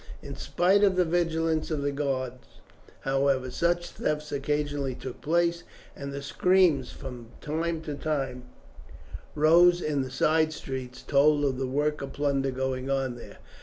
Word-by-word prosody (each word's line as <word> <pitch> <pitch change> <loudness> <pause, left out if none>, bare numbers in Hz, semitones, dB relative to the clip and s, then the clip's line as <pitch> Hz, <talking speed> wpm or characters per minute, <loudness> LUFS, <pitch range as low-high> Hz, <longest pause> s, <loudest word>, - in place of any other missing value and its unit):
In 140 -1 -7
spite 190 +8 +2
of 195 -2 +4
the 180 -1 +3
vigilance 165 -2 0
of 150 -3 -2
the 145 - 0
guard, 135 -3 -2 0.7
however, 135 -1 +1
such 175 +4 0
thefts 150 0 -2
occasionally 145 -1 -1
took 130 -1 -8
place, 170 +2 +1 0.3
and 140 0 -6
the 140 0 -6
screams 170 -3 +3
that - - -13
from 125 -3 -8
time 160 +2 -2
to 150 - -4
time 135 -4 -3 0.9
rose 170 +3 +6
in 150 -5 -1
the 130 - -4
side 155 +4 +2
streets 130 -3 -6
told 145 +1 +3
of 130 -2 -1
the 135 - -1
work 150 +3 0
of 135 -1 -6
plunder 140 -1 0
going 130 0 -2
on 135 -2 0
there. 120 - -11
145 Hz, 160 wpm, -27 LUFS, 135-160 Hz, 0.9 s, rose